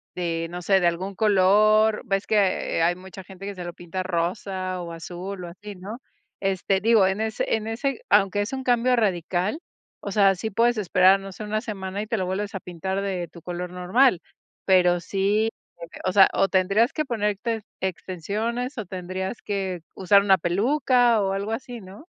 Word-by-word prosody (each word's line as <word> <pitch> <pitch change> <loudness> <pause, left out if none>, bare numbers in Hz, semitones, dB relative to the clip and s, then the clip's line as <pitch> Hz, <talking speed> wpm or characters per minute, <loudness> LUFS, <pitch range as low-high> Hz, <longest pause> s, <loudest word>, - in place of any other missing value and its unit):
de, 165 -2 -2
no 175 +1 -6
sé, 195 +2 +4
de 175 - +3
algún 185 +4 -2
color, 215 +2 +4
ves 195 0 -1
que 200 -5 +1
hay 175 +1 +3
mucha 190 +1 -11
gente 190 +1 -11
que 200 - -4
se 180 - -7
lo 175 0 -6
pinta 175 +2 -5
rosa 185 +1 -2
o 170 - -7
azul 180 +3 -7
o - - -6
así, 205 +3 -10
¿no?, 205 +7 -8 0.4
este, 195 0 0
digo 220 -3 +5
en 195 +3 0
ese 220 0 -1
en 220 0 -6
ese 275 - -2
aunque 195 +1 +3
es 205 - -3
un 265 -1 -4
cambio 250 0 +3
radical, 190 - 0 0.4
o 200 - -5
sea, 195 -1 +4
sí 220 +4 -4
puedes 235 +3 +2
esperar, 190 0 +4
no 195 0 -8
sé, 215 - -8
una 215 +1 -2
semana 200 -4 -5
y 215 - -6
te 225 0 -1
lo 190 - -1
vuelves 200 +2 -3
a - - -2
pintar 190 +3 -4
de 185 -3 -3
tu 170 - -14
color 180 0 -5
normal, 180 +5 +3 0.5
pero 180 -2 +4
sí 205 +4 0 0.3
de 170 - -8
que, - - -12
o 185 - +2
sea, 195 0 +7
o 195 - +3
tendrías 195 +5 +2
que 305 -1 -1
ponerte 220 -1 -2 0.2
extensiones 210 - -3
o 220 - -4
tendrías 185 +3 -5
que 190 -3 -3 0.2
usar 200 +1 +4
una 195 -1 +4
peluca, 240 - +2
o 195 -1 0
algo 200 +2 -3
así, 245 +1 -5
¿no? 195 - -13
195 Hz, 195 wpm, -24 LUFS, 185-215 Hz, 0.5 s, sea